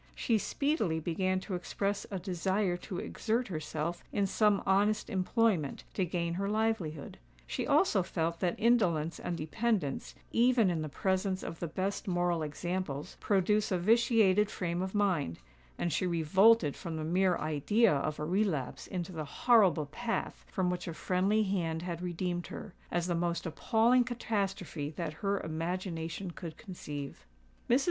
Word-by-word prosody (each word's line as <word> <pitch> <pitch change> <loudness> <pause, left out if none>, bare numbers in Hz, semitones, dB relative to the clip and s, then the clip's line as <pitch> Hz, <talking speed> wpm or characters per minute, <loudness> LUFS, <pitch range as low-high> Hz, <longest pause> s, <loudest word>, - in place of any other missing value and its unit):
She 225 -3 +1
speedily 245 - 0
began 185 +3 0
to 195 - -6
express 200 +3 -2
a 195 - -3
desire 185 +1 0
to 180 +1 -6
exert 230 +4 -1
herself 160 0 -3
in 200 - +1
some 205 +1 +2
honest 205 +3 +2
employment 190 - +1
to 190 - +1
gain 170 -1 -1
her 195 +3 -1
livelihood;—she 155 - -3
also - - +4
felt 165 +1 -2
that 175 -2 0
indolence 175 -9 +2
and 175 - -3
dependence, 185 -1 -1 0.2
even 235 -4 +4
in 165 -2 -1
the 155 - -4
presence 190 +4 0
of 165 - -6
the 170 - -2
best 190 +6 -3
moral 175 -2 +1
examples, 160 0 -3
produce 205 +2 +2
a 185 - +2
vitiated 210 0 +4
frame 175 -3 -2
of 190 +2 -3
mind;—and 85 - -2
she 185 - +1
revolted 170 +1 +4
from 170 -3 -5
the 155 - -3
mere 180 +2 +2
idea 155 +9 +2
of 150 +2 -1
a 150 - -2
relapse 175 -7 -1
into 180 -1 -4
the 160 -3 -4
horrible 190 - +4
path 230 +11 -3
from 185 -2 +1
which 180 - -4
a 165 - -4
friendly 195 +6 +2
hand 170 -5 -1
had 175 -1 -4
redeemed 175 0 -2
her, 195 - -8 0.2
as 175 -1 0
the 175 - 0
most 170 +1 -1
appalling 230 +8 +3
catastrophe 195 - -2
that 165 -3 -3
her 200 -1 +1
imagination 165 +2 -3
could 170 -2 -8
conceive. 145 - -7 0.5
Mrs. 245 - +5
180 Hz, 155 wpm, -31 LUFS, 165-205 Hz, 0.5 s, Mrs